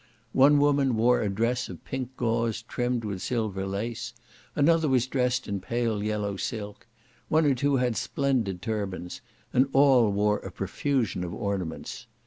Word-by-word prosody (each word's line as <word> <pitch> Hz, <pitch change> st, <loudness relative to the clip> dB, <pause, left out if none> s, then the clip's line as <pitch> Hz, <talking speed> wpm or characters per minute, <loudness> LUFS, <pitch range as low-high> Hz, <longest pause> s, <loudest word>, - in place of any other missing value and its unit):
One 140 Hz, +2 st, +6 dB
woman 140 Hz, -3 st, +3 dB
wore 120 Hz, +2 st, +4 dB
a 105 Hz, -, 0 dB
dress 115 Hz, +5 st, 0 dB
of -, -, -10 dB
pink 130 Hz, -1 st, -5 dB
gauze 115 Hz, -1 st, 0 dB
trimmed 120 Hz, 0 st, -2 dB
with 100 Hz, -3 st, -4 dB
silver 105 Hz, -6 st, -2 dB
lace; 115 Hz, +4 st, -4 dB, 0.4 s
another 160 Hz, +1 st, +3 dB
was 130 Hz, -2 st, +3 dB
dressed 130 Hz, -1 st, 0 dB
in 100 Hz, -1 st, -2 dB
pale 115 Hz, +1 st, -1 dB
yellow 105 Hz, -1 st, -2 dB
silk; 105 Hz, +1 st, -5 dB, 0.4 s
one 155 Hz, 0 st, +3 dB
or 145 Hz, -, +4 dB
two 140 Hz, +2 st, +1 dB
had 125 Hz, -3 st, +1 dB
splendid 115 Hz, -12 st, -1 dB
turbans; 100 Hz, -5 st, -4 dB, 0.3 s
and 130 Hz, +2 st, +4 dB
all 135 Hz, -6 st, +5 dB
wore 105 Hz, +1 st, +2 dB
a -, -, -8 dB
profusion 130 Hz, -10 st, -1 dB
of 85 Hz, -, -5 dB
ornaments. 95 Hz, -5 st, -4 dB
115 Hz, 155 wpm, -27 LUFS, 105-130 Hz, 0.4 s, One